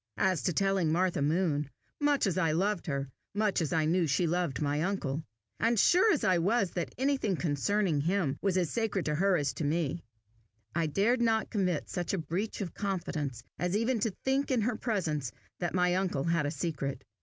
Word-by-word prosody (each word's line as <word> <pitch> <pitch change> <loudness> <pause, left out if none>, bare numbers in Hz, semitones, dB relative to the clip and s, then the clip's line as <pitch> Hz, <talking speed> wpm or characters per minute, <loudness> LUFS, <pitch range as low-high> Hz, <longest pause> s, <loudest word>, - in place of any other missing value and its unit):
As 185 -5 +2
to - - 0
telling 195 -3 +2
Martha 175 -2 +1
Moon, 150 -1 +1 0.3
much 290 -3 +2
as 195 - 0
I 165 -4 +2
loved 195 +2 0
her, 140 -2 -2 0.3
much 205 -3 +1
as 155 - -1
I 160 -1 +2
knew 170 +1 +2
she 150 +5 +2
loved 170 -6 0
my 145 0 0
uncle, 165 -6 -1 0.4
and 230 +1 +2
sure 375 - +5
as 300 - +1
I 185 -2 +3
was 195 +2 +1
that 165 -8 -4
anything 265 -6 +1
concerning 165 +1 +1
him 170 -3 0
was 195 -2 +1
as 175 -4 0
sacred 220 -5 -1
to 150 - 0
her 190 +4 +3
as 140 -3 -1
to - - -4
me, 160 +1 -1 0.7
I 165 -2 +1
dared 215 - +2
not 225 -2 +1
commit 185 -7 0
such 175 +1 -3
a - - +1
breach 180 +8 -3
of 180 -4 -4
confidence 160 - -3 0.2
as 180 +3 +1
even 230 +2 +1
to 225 +2 +1 0.2
think 270 +1 +1
in 255 -4 +2
her 235 +2 0
presence 160 - -1 0.3
that 175 0 -2
my 180 -1 +3
uncle 180 -7 0
had 170 -2 +1
a - - -2
secret. 140 -3 -3
180 Hz, 200 wpm, -30 LUFS, 155-205 Hz, 0.7 s, sure